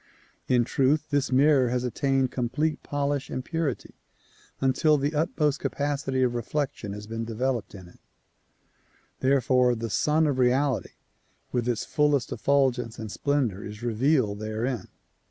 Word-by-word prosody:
In 125 -1 +3
truth 145 +5 +1
this 145 -2 +1
mirror 135 -1 +4
has 125 0 -1
attained 135 +1 0
complete 145 +5 -1
polish 145 -1 -2
and 130 - -4
purity 160 -6 -3 0.7
until 135 +3 +3
the 145 +2 -1
utmost 150 -1 0
capacity 140 -2 -1
of 125 -1 +1
reflection 120 -3 -3
has 105 +1 -7
been 115 +1 -4
developed 115 0 -2
in 95 -2 -11
it, 90 - -19 1.2
therefore 130 -2 +3
the 115 -1 -4
Sun 155 +8 +2
of 140 -3 0
Reality 130 +1 +1 0.6
with 125 -1 -1
its 120 -3 -1
fullest 145 -3 +1
effulgence 130 -5 +1
and 110 -2 -6
splendor 130 -10 -1
is 105 +2 -8
revealed 120 -2 +1
therein. 110 +1 -3
130 Hz, 135 wpm, -26 LUFS, 120-145 Hz, 1.2 s, mirror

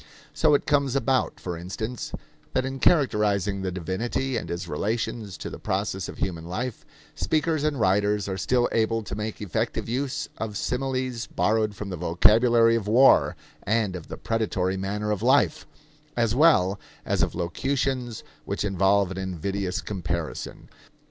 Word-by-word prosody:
So 150 - +4
it - - 0
comes 140 -3 +2
about, 135 -1 +1
for 90 -2 -4
instance, 105 +8 -5 0.4
that 130 - +1
in 135 0 -4
characterizing 105 - +2
the 95 -1 -2
divinity 95 +9 -2
and 95 -7 -3
his 85 +1 -4
relations 105 +3 -2
to - - -6
the - - -7
process 95 -1 -2
of - - -9
human 85 -3 -3
life, 115 +7 -4 0.3
speakers 155 -1 0
and 150 -3 0
writers 105 0 +2
are 95 - -2
still 120 +7 +2
able 115 0 +1
to - - -7
make 105 0 -4
effective 110 +5 -2
use 130 +3 -2
of 105 -2 -3
similes 130 -1 -2
borrowed 110 -1 +1
from 100 +1 -6
the 90 - -4
vocabulary 115 +7 +4
of 110 -3 -2
war 125 +5 +5 0.3
and 105 -3 0
of 85 - -8
the - - -7
predatory 100 -5 -1
manner 105 +2 -2
of 105 - -1
life, - - +3 0.5
as 115 -2 +2
well 120 - +4 0.3
as - - 0
of - - 0
locutions 125 +6 -2 0.2
which 100 +3 -2
involve 95 0 +2
an 95 - -5
invidious 95 +1 -2
comparison. 85 -5 -4
105 Hz, 155 wpm, -26 LUFS, 95-120 Hz, 0.5 s, war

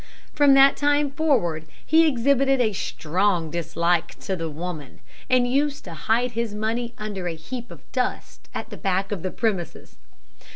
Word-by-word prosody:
From 285 -2 +5
that 275 0 +7
time 290 0 +2
forward 220 - 0 0.2
he 320 +1 +5
exhibited 270 0 +2
a 220 -4 +2
strong 175 -1 -1
dislike 170 +1 0
to 190 - -2
the 165 -2 -4
woman, 155 -2 -7 0.3
and 250 -1 +4
used 280 +3 0
to 175 - -8
hide 225 +10 0
his 230 -2 -3
money 230 +3 -2
under 205 -4 -4
a 165 - -3
heap 235 +9 -7
of - - -12
dust 255 -1 -3
at - - -6
the - - -7
back 195 -1 -1
of 200 -5 -3
the 185 - -2
premises. 195 -5 -3
215 Hz, 165 wpm, -24 LUFS, 175-265 Hz, 0.3 s, that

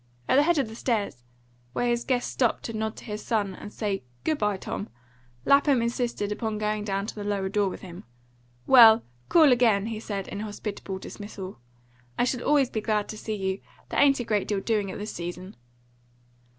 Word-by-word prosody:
At - - +4
the - - +7
head 335 +2 +3
of 270 -5 +1
the 220 - -9
stairs, 215 - -2 0.5
where 245 - 0
his 240 0 +1
guest 250 -2 0
stopped 245 -4 +1
to 230 - -5
nod 220 0 -2
to - - -11
his 210 -2 -5
son 205 -5 0
and 205 - -9
say 205 -3 -2 0.2
"Good 310 -2 0
bye, 210 -2 +1
Tom," 200 +2 -5 0.6
Lapham 280 -1 +5
insisted 235 -3 -1
upon 220 0 -2
going 210 0 -1
down 200 -1 -1
to - - -5
the 210 - -6
lower 200 -2 -1
door 200 0 +1
with - - -8
him 180 -1 -10 0.6
"Well, 230 -3 +8 0.3
call 315 -5 +6
again," 225 -5 +4
he 225 -1 -4
said 200 -3 -4
in - - -5
hospitable 205 -2 -5
dismissal. 195 - -8 0.6
"I - - +3
shall 250 0 0
always 280 -3 +3
be 220 - -2
glad 210 -1 0
to - - -5
see 215 0 -4
you. 190 -1 -2 0.3
There - - -1
ain't 275 -2 +5
a - - -1
great 210 -3 0
deal 205 -2 0
doing 210 -1 0
at - - -6
this 210 +1 -5
season." 175 +3 -6
215 Hz, 205 wpm, -26 LUFS, 200-240 Hz, 0.6 s, Well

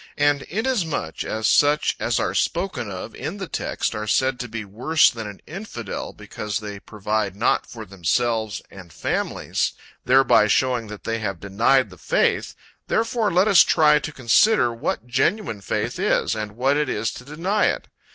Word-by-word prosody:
And 145 -1 +3
inasmuch, 180 - -2
as 110 0 -3
such 145 +1 +3
as - - 0
are - - -1
spoken 175 - -1
of 100 +4 -7
in 160 +7 -5
the 190 -3 -5
text - - -2
are 105 -1 -4
said 130 +3 +1
to 125 - -4
be 110 -1 -6
worse 125 +11 +3
than 115 -3 -6
an 100 -1 -10
infidel, 160 - -6
because 105 -1 -5
they 105 -2 -7
provide 105 -1 -2
not 110 +4 +1
for 115 -2 -9
themselves 110 +4 -1
and 90 -3 -12
families, - - -2 0.3
thereby 130 -4 +5
showing 125 0 +1
that 105 -1 -9
they 115 0 -2
have 100 -5 -3
denied 110 +5 +2
the 90 - -14
faith, - - +1 0.3
therefore 225 -1 +1
let 185 +4 +3
us 200 -4 +7
try 150 -1 +4
to 155 - -5
consider 130 - +3
what 115 0 -3
genuine 130 - 0
faith - - -2
is, - - +1
and 105 -1 -4
what 135 +5 +1
it 150 - 0
is 110 +2 -1
to - - -10
deny 170 +10 0
it. - - -2
120 Hz, 170 wpm, -23 LUFS, 105-150 Hz, 0.3 s, us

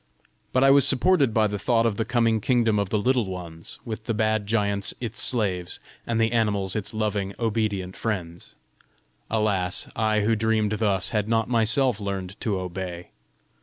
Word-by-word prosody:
But 130 - +2
I 135 - +6
was 140 -1 +6
supported 140 -1 +3
by 110 0 +2
the 105 -1 -2
thought 115 +2 +2
of 110 -3 0
the 115 - -1
coming 115 -3 +1
kingdom 115 -3 +2
of 100 -2 -1
the 105 - +1
Little 120 0 +1
Ones, 85 -3 -7
with 110 -1 -6
the 115 - -1
bad 110 -1 0
giants 100 -2 0
its 120 +1 -3
slaves, 95 -7 0 0.3
and 115 -1 0
the 115 0 +2
animals 105 -5 +1
its 105 -3 -3
loving, 105 -3 -2
obedient 105 -5 -1
friends! 85 -7 -5 0.7
Alas, 100 -5 0
I 110 -1 +1
who 110 +2 +2
dreamed 110 -1 +1
thus, 100 -3 +1
had 105 -1 -1
not 115 0 +1
myself 120 0 +2
learned 100 -2 -4
to 100 -4 -1
obey! 90 -1 -6
110 Hz, 170 wpm, -25 LUFS, 100-115 Hz, 0.7 s, I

